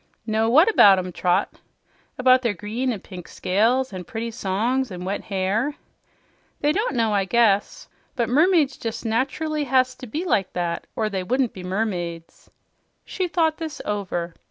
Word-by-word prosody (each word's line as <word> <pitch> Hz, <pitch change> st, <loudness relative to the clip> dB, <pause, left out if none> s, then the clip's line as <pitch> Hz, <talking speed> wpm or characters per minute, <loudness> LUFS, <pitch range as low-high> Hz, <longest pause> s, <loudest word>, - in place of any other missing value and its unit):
"Know 220 Hz, 0 st, +1 dB
what 310 Hz, -, +6 dB
about 205 Hz, -, +7 dB
'em, 185 Hz, 0 st, -3 dB
Trot?" 180 Hz, +3 st, 0 dB, 0.6 s
"About 255 Hz, 0 st, +5 dB
their 230 Hz, -5 st, -1 dB
green 225 Hz, +7 st, -2 dB
and 210 Hz, -5 st, -6 dB
pink 180 Hz, -3 st, -10 dB
scales 230 Hz, +6 st, +1 dB
and 180 Hz, -2 st, -7 dB
pretty 230 Hz, +1 st, -4 dB
songs 230 Hz, +5 st, -1 dB
and 180 Hz, -2 st, -7 dB
wet 200 Hz, +2 st, -3 dB
hair." 205 Hz, +8 st, -1 dB, 0.9 s
"They 295 Hz, -, +3 dB
don't 420 Hz, -, -1 dB
know, 225 Hz, -3 st, +1 dB
I 200 Hz, -1 st, +1 dB
guess. 205 Hz, -2 st, +1 dB, 0.3 s
But 235 Hz, -3 st, 0 dB
mermaids 305 Hz, +2 st, +3 dB
jes' 225 Hz, 0 st, -4 dB
natcherly 275 Hz, +6 st, -1 dB
has 255 Hz, -1 st, +2 dB
to 255 Hz, -, -9 dB
be 310 Hz, +11 st, -4 dB
like 200 Hz, -, 0 dB
that, 175 Hz, -1 st, -3 dB
or 220 Hz, -, 0 dB
they 195 Hz, -3 st, -2 dB
wouldn't 250 Hz, +5 st, 0 dB
be 185 Hz, -, -9 dB
mermaids." 180 Hz, -4 st, -4 dB, 0.6 s
She 370 Hz, -, -2 dB
thought 325 Hz, -2 st, +1 dB
this 320 Hz, -3 st, -6 dB
over. 180 Hz, -4 st, -3 dB
225 Hz, 165 wpm, -23 LUFS, 190-265 Hz, 0.9 s, about